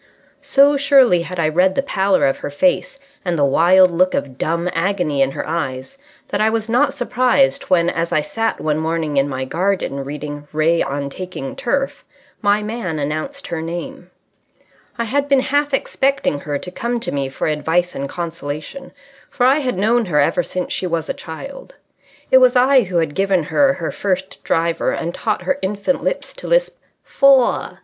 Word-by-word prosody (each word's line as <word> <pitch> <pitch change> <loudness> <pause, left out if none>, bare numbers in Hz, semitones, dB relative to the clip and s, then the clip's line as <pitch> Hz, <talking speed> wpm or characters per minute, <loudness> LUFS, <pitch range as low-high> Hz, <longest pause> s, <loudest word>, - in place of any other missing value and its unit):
So 285 +1 +4
surely 270 - +4
had 180 +1 -6
I 160 - +2
read 180 +4 +2
the 275 - +1
pallor 195 -7 +1
of 135 - 0
her - - -5
face 270 - 0 0.3
and 175 -2 -1
the 145 - +3
wild 180 +6 +5
look 185 +2 +2
of 130 -2 -4
dumb 170 +2 -1
agony 170 -5 0
in 135 - +3
her - - -5
eyes 135 - -4 0.3
that - - -1
I 215 - +4
was 220 0 -2
not 270 +5 +2
surprised 245 - +1
when, 175 -2 +3
as 170 -1 -1
I 155 - +2
sat 225 +9 -2
one 155 0 -1
morning 160 -2 -2
in 140 +1 +2
my 130 -1 -3
garden 175 -3 -1
reading 145 +1 -7
Ray 160 +2 +2
on 140 0 -3
Taking 185 - -6
Turf, 270 +1 -2 0.4
my 205 0 +2
man 210 -7 -4
announced 155 - -4
her 165 -2 -4
name. 170 +2 -6 0.9
I 235 - -1
had 280 +5 -1
been 275 -2 +4
half 290 +2 0
expecting 270 - 0
her 145 0 -3
to 180 - -8
come 235 +5 -2
to 230 - -4
me 140 -1 -2
for 135 - -4
advice 160 +4 0
and 140 0 -5
consolation, 170 - -6 0.4
for 245 - 0
I 270 +4 +4
had 255 -8 -2
known 225 +4 +2
her 150 -4 +1
ever 165 +5 +2
since 180 +1 -4
she 185 - -2
was 165 -2 -2
a - - 0
child. 275 - -9 0.6
It 260 - +8
was 255 0 +4
I 255 -1 +5
who 180 -1 -2
had 160 -3 0
given 195 -2 +1
her 275 - +2
her - - -4
first 190 -1 -3
driver 165 0 0
and 170 - -3
taught 215 +2 -2
her 275 0 -1
infant 200 +7 -1
lips - - -2
to - - -9
lisp - - +1 0.2
"Fore!" 275 -3 +3
180 Hz, 190 wpm, -19 LUFS, 155-250 Hz, 0.9 s, It